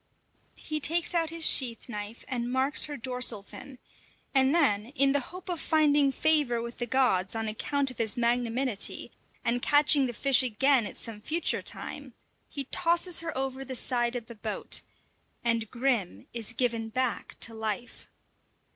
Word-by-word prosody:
He 310 -1 -4
takes 335 +4 +1
out 330 -2 +1
his 330 0 -1
sheath 240 -4 +2
knife 210 -1 -7
and 245 -1 -3
marks 265 +3 +2
her 295 -1 -6
dorsal 250 -4 0
fin; 260 +5 -12 0.6
and 265 +2 +3
then, 215 -10 +2
in 275 -1 +5
the 285 - +2
hope 365 +1 -10
of 350 -3 -3
finding 295 -3 +3
favour 290 -4 +2
with 235 +1 -7
the 240 - -2
gods 225 -6 +1
on 225 0 -2
account 275 +5 +1
of 255 - -14
his 230 +2 +1
magnanimity, 240 -1 -1 0.3
and 240 +1 +2
catching 290 -1 +4
the 240 - -5
fish 275 +3 +4
again 255 0 +2
at - - -9
some 220 -3 -3
future 320 +8 +1
time, - - -3 0.3
he 280 - -3
tosses 340 +5 +1
her 325 -4 -5
over 265 0 -3
the 265 -1 -6
side 240 -1 0
of 240 -2 -4
the 235 - -10
boat, 215 -1 -1 0.6
and 230 -2 0
Grim 235 - -1
is 230 -2 -4
given 230 -2 -1
back 255 +1 -3
to 225 - +3
life. 220 +2 -5
255 Hz, 165 wpm, -28 LUFS, 230-285 Hz, 0.6 s, in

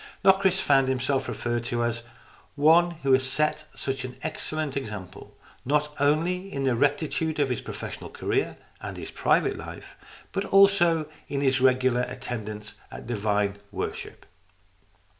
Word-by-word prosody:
Locris 190 -1 +4
found 135 -2 +4
himself 130 +1 0
referred 120 -1 -2
to 120 0 -1
as 120 0 -1 0.3
" - - -25 0.2
one 160 +4 +5
who 135 -1 +4
has 130 0 +4
set 150 +4 0
such 135 -1 -3
an 125 -1 -6
excellent 155 -3 -3
example, 105 -9 -7 0.3
not 150 +2 +1
only 170 +7 +1
in 140 - -3
the 130 -3 +2
rectitude 145 +4 0
of 145 -2 +2
his 125 - -2
professional - - -7
career - - -1 0.2
and - - -6
his - - -7
private - - +2
life, - - -9 0.4
but 195 0 -1
also 185 -5 +5 0.2
in 140 -1 -2
his 130 -2 +2
regular 130 -1 +3
attendance 110 -4 -5 0.2
at - - -9
divine 105 -3 0
worship." - - -5
135 Hz, 145 wpm, -26 LUFS, 120-155 Hz, 0.4 s, one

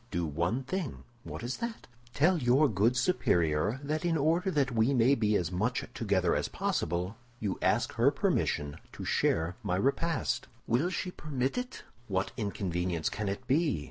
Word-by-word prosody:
"Do 85 -4 -1
one 85 - -1
thing." 185 0 -4 0.2
"What - - -7
is 125 +2 -3
that?" 235 -1 -5 0.3
"Tell 170 +4 +4
your 130 +3 +4
good 115 +3 +2
superior 95 - +2
that 155 +2 -2
in 170 -2 +2
order 165 +6 +2
that 140 -7 +1
we 115 +4 +2
may 125 +3 +5
be 110 -5 +2
as 90 -3 0
much 110 +8 0
together 95 -5 +1
as - - 0
possible, 90 +5 -2 0.2
you 100 -3 -2
ask - - +2
her - - +4
permission 75 0 0 0.2
to - - -7
share 80 +4 +1
my 100 -5 -1
repast." 140 - 0 0.2
"Will 130 +10 +2
she 185 0 -3
permit 135 -6 -2
it?" 250 0 -4 0.2
"What 95 -1 -1
inconvenience 90 -6 -1
can 105 -1 -3
it 100 - -4
be?" 150 - +2
120 Hz, 170 wpm, -30 LUFS, 90-150 Hz, 0.3 s, may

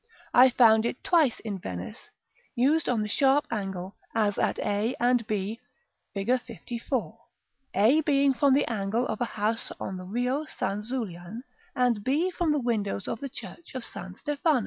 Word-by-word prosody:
I 255 +2 +8
found 230 -2 +5
it 245 - -5
twice 315 -9 +3
in 205 -4 -4
Venice, 90 - -7 0.5
used 285 +7 +2
on 230 -4 +1
the - - -3
sharp 275 +5 +3
angle, 195 -3 -4 0.2
as 210 -2 +1
at - - +1
a 210 +4 0
and 245 -2 +2
b, 210 +1 -2 0.6
Fig. 195 0 -3
LIV., 245 -1 -3 0.8
a 225 +11 +5
being 280 -2 +3
from 270 +1 +4
the 285 - +3
angle 220 +2 -1
of - - -4
a - - +3
house 220 0 -2
on 190 - -4
the 185 - -7
Rio 250 +9 -1
San 200 -8 -3
Zulian, 215 -3 -5 0.3
and 245 -5 +2
b 310 - +1
from 345 -3 0
the 295 - +2
windows 215 -6 -1
of - - -3
the 275 - -5
church 280 +4 -10
of 255 - -4
San 185 0 -8
Stefano. 295 - +1
235 Hz, 170 wpm, -27 LUFS, 205-270 Hz, 0.8 s, I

